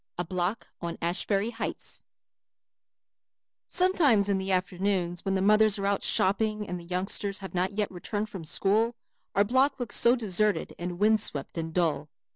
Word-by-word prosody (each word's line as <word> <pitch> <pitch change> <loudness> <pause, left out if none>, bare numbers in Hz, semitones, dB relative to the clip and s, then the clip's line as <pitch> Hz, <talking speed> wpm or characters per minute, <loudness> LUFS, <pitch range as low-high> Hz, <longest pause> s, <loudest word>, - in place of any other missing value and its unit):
A 175 - -2
Block 185 +5 -2 0.2
on 170 -1 -4
Ashbury 195 +5 0
Heights 225 - -6 1.6
Sometimes 300 - +3
in 195 -1 +1
the 190 0 -3
afternoons 180 -1 -1
when 195 0 0
the 190 - +1
mothers 215 0 +4
are 195 - -3
out 200 0 +1
shopping 210 +2 +1
and 180 0 -4
the 170 - -12
youngsters 190 +3 -1
have 190 -1 -8
not 185 +2 0
yet 210 0 -1
returned 205 +4 -4
from 195 -5 -8
school 215 +8 +1 0.4
our 200 - +5
block 260 +5 +2
looks 245 -3 -3
so 240 +1 +5
deserted 215 -3 0
and 175 0 -4
wind 215 +3 +4
swept 145 -9 -2
and 165 -1 -3
dull. 160 -3 0
195 Hz, 165 wpm, -28 LUFS, 180-215 Hz, 1.6 s, our